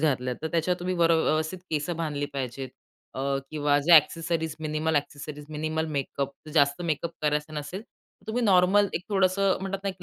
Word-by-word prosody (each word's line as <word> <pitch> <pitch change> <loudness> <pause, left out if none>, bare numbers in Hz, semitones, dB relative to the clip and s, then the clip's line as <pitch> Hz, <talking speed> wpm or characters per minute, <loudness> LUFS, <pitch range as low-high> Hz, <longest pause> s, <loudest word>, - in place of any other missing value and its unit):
घातलात, 125 -5 +1
तर - - -1
त्याच्यात 170 +2 +1
तुम्ही 185 +1 -1
वर 170 -1 +3
अ, - - +6
व्यवस्थित 155 +4 0
केसं 155 +2 -1
बांधली 145 -3 -2
पाहिजेत. 130 -1 -4 0.5
अ, 130 - -4 0.3
किंवा 145 -2 +2
जे 165 +3 +8
accessories, 160 +1 +1
minimal 155 0 0
accessories, 145 +1 -4
minimal 155 +1 -2
makeup. 140 0 -3 0.2
जास्त 140 +2 +3
मेकअप 170 0 -1
करायचं 150 +1 0
नसेल 150 +7 -5 0.4
तुम्ही 240 +3 -1
नॉर्मल 195 0 +5
एक 175 - -1
थोडंसं 195 -1 +2
म्हणतात 195 0 -3
ना, - - +1
एक 185 -1 -7
160 Hz, 175 wpm, -27 LUFS, 145-180 Hz, 0.5 s, जे